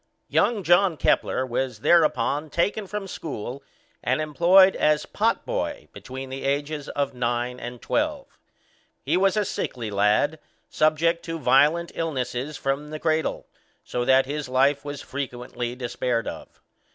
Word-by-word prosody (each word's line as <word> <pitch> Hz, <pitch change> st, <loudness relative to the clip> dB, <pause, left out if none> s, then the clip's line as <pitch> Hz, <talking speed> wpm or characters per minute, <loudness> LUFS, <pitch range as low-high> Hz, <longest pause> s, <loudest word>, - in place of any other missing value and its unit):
Young 220 Hz, -5 st, +2 dB
John 175 Hz, 0 st, +4 dB
Kepler 130 Hz, -, +1 dB
was 125 Hz, -2 st, -3 dB
thereupon 155 Hz, -2 st, +3 dB
taken 200 Hz, +6 st, 0 dB
from 210 Hz, 0 st, -5 dB
school, 140 Hz, -, -6 dB, 0.4 s
and 130 Hz, +4 st, +1 dB
employed 175 Hz, +5 st, +5 dB
as 150 Hz, 0 st, +2 dB
pot -, -, 0 dB
boy -, -, -3 dB
between 130 Hz, +1 st, -8 dB
the 135 Hz, -, -5 dB
ages 145 Hz, +1 st, -2 dB
of 140 Hz, -1 st, -2 dB
nine 120 Hz, 0 st, -2 dB
and 120 Hz, +1 st, -7 dB
twelve. 295 Hz, -2 st, -2 dB, 0.6 s
He -, -, +1 dB
was 195 Hz, +3 st, +3 dB
a 210 Hz, -, +2 dB
sickly 115 Hz, -, -4 dB
lad, 105 Hz, +10 st, +2 dB, 0.3 s
subject 160 Hz, +2 st, +2 dB
to 165 Hz, 0 st, -4 dB
violent 150 Hz, +5 st, +3 dB
illnesses 135 Hz, -2 st, -3 dB
from 140 Hz, +2 st, -2 dB
the 155 Hz, -, -5 dB
cradle, 160 Hz, 0 st, 0 dB, 0.4 s
so 125 Hz, -, -2 dB
that 130 Hz, +1 st, +4 dB
his 145 Hz, -1 st, -4 dB
life 135 Hz, +2 st, +2 dB
was 145 Hz, -1 st, -6 dB
frequently 125 Hz, -2 st, -5 dB
despaired 120 Hz, -1 st, -2 dB
of. -, -, -8 dB
145 Hz, 140 wpm, -25 LUFS, 125-165 Hz, 0.6 s, employed